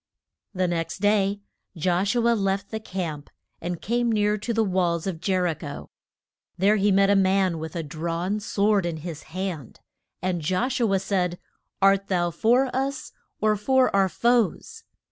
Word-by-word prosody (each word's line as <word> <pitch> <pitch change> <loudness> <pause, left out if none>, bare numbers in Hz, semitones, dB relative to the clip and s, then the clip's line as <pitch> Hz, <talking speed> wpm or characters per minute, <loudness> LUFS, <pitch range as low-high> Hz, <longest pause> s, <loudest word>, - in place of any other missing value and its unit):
The 185 0 +1
next 165 -1 -2
day 205 0 +1 0.4
Josh 180 +6 +1
u 235 -1 +2
a 235 - +5
left 195 -2 -1
the 220 - -3
camp 170 -8 -5 0.3
and 175 0 -4
came 240 +2 +1
near 210 -1 +2
to 215 +3 -4
the 225 -1 +2
walls 180 -4 0
of 175 -4 -4
Jer 185 -1 +1
i 170 - +1
cho. 145 -2 -8 0.7
There 205 +4 +3
he 205 0 +2
met 195 +1 +4
a - - +4
man 190 -3 +2
with 160 +2 -7
a 165 - -2
drawn 170 +6 -3
sword 205 -2 +1
in 165 -2 -3
his 160 -4 -6
hand. 175 - -5 0.4
And 180 -2 -2
Josh 210 - 0
u 230 -4 +2
a - - +4
said, 185 -2 -1 0.5
Art 195 0 +4
thou 175 -3 0
for 245 - +2
us 270 0 -2 0.3
or 215 0 +3
for 255 +3 +2
our 195 -1 +3
foes? 240 - 0
195 Hz, 175 wpm, -25 LUFS, 175-215 Hz, 0.7 s, a